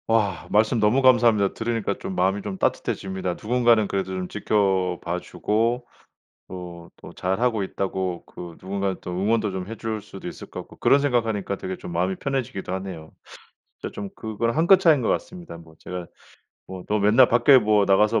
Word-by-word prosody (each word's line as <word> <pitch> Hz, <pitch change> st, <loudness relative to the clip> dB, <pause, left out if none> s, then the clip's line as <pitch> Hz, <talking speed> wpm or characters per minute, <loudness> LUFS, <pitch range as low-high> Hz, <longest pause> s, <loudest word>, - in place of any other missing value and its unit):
와. 105 Hz, -6 st, +1 dB
말씀 110 Hz, +3 st, +3 dB
너무 110 Hz, +6 st, +3 dB
감사합니다. 120 Hz, -6 st, +4 dB
들으니까 115 Hz, -3 st, -2 dB
좀 95 Hz, -, -5 dB
마음이 95 Hz, +3 st, +1 dB
좀 100 Hz, -1 st, -5 dB
따뜻해집니다. 95 Hz, -1 st, -2 dB
누군가는 115 Hz, -1 st, +2 dB
그래도 95 Hz, -1 st, -2 dB
좀 95 Hz, -1 st, -3 dB
지켜봐 90 Hz, -4 st, 0 dB
주고 115 Hz, +6 st, -1 dB, 0.6 s
또 90 Hz, -2 st, -9 dB
또 -, -, -12 dB
잘 95 Hz, +2 st, -2 dB
하고 115 Hz, -4 st, +1 dB
있다고 95 Hz, -2 st, -3 dB
그 85 Hz, -2 st, -10 dB
누군가는 95 Hz, 0 st, -2 dB
또 -, -, -6 dB
응원도 105 Hz, +3 st, 0 dB
좀 95 Hz, -1 st, -5 dB
해 115 Hz, -, -6 dB
줄 110 Hz, -1 st, -4 dB
수도 -, -, -10 dB
있을 -, -, -8 dB
것 -, -, -6 dB
같고 -, -, -15 dB
그런 140 Hz, -, +4 dB
생각 125 Hz, -5 st, +1 dB
하니까 105 Hz, -3 st, -2 dB
되게 95 Hz, 0 st, -5 dB
좀 -, -, -8 dB
마음이 90 Hz, +3 st, 0 dB
편해지기도 130 Hz, -9 st, -3 dB
하네요. 95 Hz, -4 st, -6 dB, 0.7 s
진짜 -, -, -6 dB
좀 100 Hz, -1 st, -6 dB
그걸 110 Hz, +1 st, -2 dB
한 165 Hz, +2 st, +2 dB
끗 195 Hz, 0 st, +8 dB
차이인 160 Hz, -7 st, +4 dB
것 115 Hz, -, -1 dB
같습니다. 175 Hz, -, -4 dB
뭐 80 Hz, -1 st, -16 dB
제가 90 Hz, -1 st, -6 dB, 0.6 s
뭐 95 Hz, -1 st, -8 dB
"너 105 Hz, -, +1 dB
맨날 110 Hz, +5 st, +5 dB
밖에 120 Hz, +3 st, +6 dB
뭐 105 Hz, -3 st, +3 dB
나가서 105 Hz, +3 st, +3 dB
100 Hz, 375 characters per minute, -24 LUFS, 95-115 Hz, 0.7 s, 끗